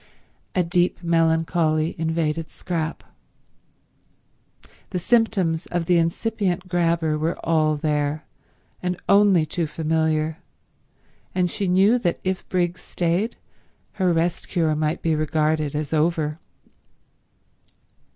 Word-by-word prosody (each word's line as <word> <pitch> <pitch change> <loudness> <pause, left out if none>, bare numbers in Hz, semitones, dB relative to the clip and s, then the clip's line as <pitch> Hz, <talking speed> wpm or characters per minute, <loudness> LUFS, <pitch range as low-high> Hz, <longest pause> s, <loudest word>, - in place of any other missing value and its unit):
A 180 - +3
deep 175 +1 0
melancholy 165 -1 +2
invaded 160 -1 -1
Scrap. 165 -3 -4 1.9
The 185 - -3
symptoms 190 -5 +1
of 175 -1 -2
the 175 0 +4
incipient 185 +1 -1
grabber 170 -3 +1
were 160 +3 -1
all 155 -2 +2
there 150 0 -1 0.6
and 180 0 -2
only 200 -5 +5
too 160 +1 -2
familiar, 160 0 0 1.0
and 180 -2 +1
she 200 - -2
knew 195 +7 +4
that 175 -7 -1
if 185 0 -3
Briggs 175 -1 0
stayed 180 +7 -1 0.7
her 185 -1 +4
rest 170 +1 0
cure 160 -4 +1
might 155 +1 -1
be 165 - +2
regarded 155 -1 0
as 150 +1 -3
over. 155 -1 +1
165 Hz, 110 wpm, -23 LUFS, 155-180 Hz, 1.9 s, only